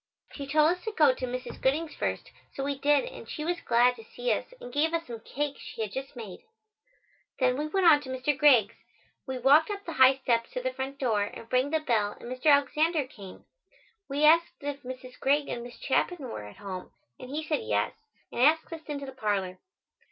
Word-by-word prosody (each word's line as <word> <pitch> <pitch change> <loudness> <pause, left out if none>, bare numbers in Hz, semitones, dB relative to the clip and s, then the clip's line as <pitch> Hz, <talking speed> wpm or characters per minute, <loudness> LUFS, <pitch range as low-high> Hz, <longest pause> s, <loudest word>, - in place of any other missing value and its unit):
She 280 -2 -6
told 305 +3 +4
us 360 - -19
to 440 - -2
go 300 -8 +5
to 255 0 -4
Mrs. 250 +1 -6
Gooding's 305 +5 +1
first, - - -3 0.2
so 270 - -3
we 280 +1 0
did 290 - +3
and - - -10
she 305 - -5
was 345 0 -1
glad 240 +1 +3
to 225 - -11
see 245 +2 -1
us - - -4
and 245 - -10
gave 320 +3 +2
us 335 0 -2
some 235 -2 -7
cake 285 +5 -4
she 225 - -6
had 210 - -5
just 270 +4 -6
made. 215 -7 -8 1.0
Then 255 -1 +2
we 300 +3 -2
went 380 +3 +1
on 300 -3 +7
to 270 - -10
Mr. 260 +3 0
Greig's. 255 -8 +5 0.5
We 260 -1 -3
walked 280 - +5
up 405 -1 -5
the 335 - -5
high 260 -1 +6
steps 235 -3 0
to 250 - -3
the 255 0 -1
front 265 +1 -5
door 220 -7 +1
and 225 +3 -10
rang 255 +2 +3
the 315 +1 0
bell 215 -8 0
and 240 - -8
Mr. 255 +4 -3
Alexander 300 +2 +3
came. 200 -7 -12 0.6
We 285 +2 -1
asked 335 +2 +5
if 285 -1 -4
Mrs. 255 0 -9
Greig 285 +2 +2
and 240 - -4
Miss 240 0 -10
Chapin 355 +6 0
were 105 - -6
at 105 - -13
home 190 -3 -7 0.3
and 255 - -9
he 300 +3 -3
said 310 +7 -1
yes, 455 - 0 0.4
and - - -3
asked 320 +5 +3
us 325 - -7
into 285 -2 -4
the 265 - -7
parlor. 200 -7 -2
270 Hz, 220 wpm, -28 LUFS, 245-305 Hz, 1.0 s, on